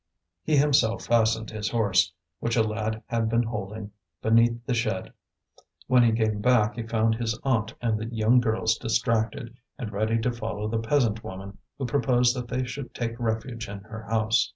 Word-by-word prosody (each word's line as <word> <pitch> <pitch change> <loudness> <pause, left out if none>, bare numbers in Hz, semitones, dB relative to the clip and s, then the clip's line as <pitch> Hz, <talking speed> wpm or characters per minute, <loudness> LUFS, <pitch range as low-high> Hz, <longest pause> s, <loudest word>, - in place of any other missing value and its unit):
He 155 -2 +1
himself 140 -6 +3
fastened 115 -1 +2
his 110 0 -3
horse, 100 -7 +2 0.3
which 115 0 -1
a 115 - +4
lad 110 0 -3
had 115 -1 -1
been 115 +1 +2
holding, 105 -2 -5 0.3
beneath 115 +1 +3
the 130 - 0
shed. 110 -5 -2 0.7
When 125 -1 +5
he 120 -1 +5
came 110 -2 0
back 120 -2 +3
he 120 - -4
found 115 0 +1
his 110 -1 -2
aunt 115 -4 0
and 110 -2 +1
the 110 - -4
young 115 +1 +3
girls 110 -1 +1
distracted, 115 0 -1 0.2
and 120 -7 -5
ready 110 +2 0
to 125 - +1
follow 110 -2 -4
the 110 +1 -1
peasant 115 -2 +1
woman, 95 +1 -8 0.2
who 135 - -3
proposed 125 -2 +2
that 125 -1 -4
they 130 +2 -1
should 125 +2 -7
take 115 0 -3
refuge 115 0 -3
in 100 0 -7
her 110 +2 -9
house. 110 0 +2
115 Hz, 180 wpm, -26 LUFS, 110-120 Hz, 0.7 s, When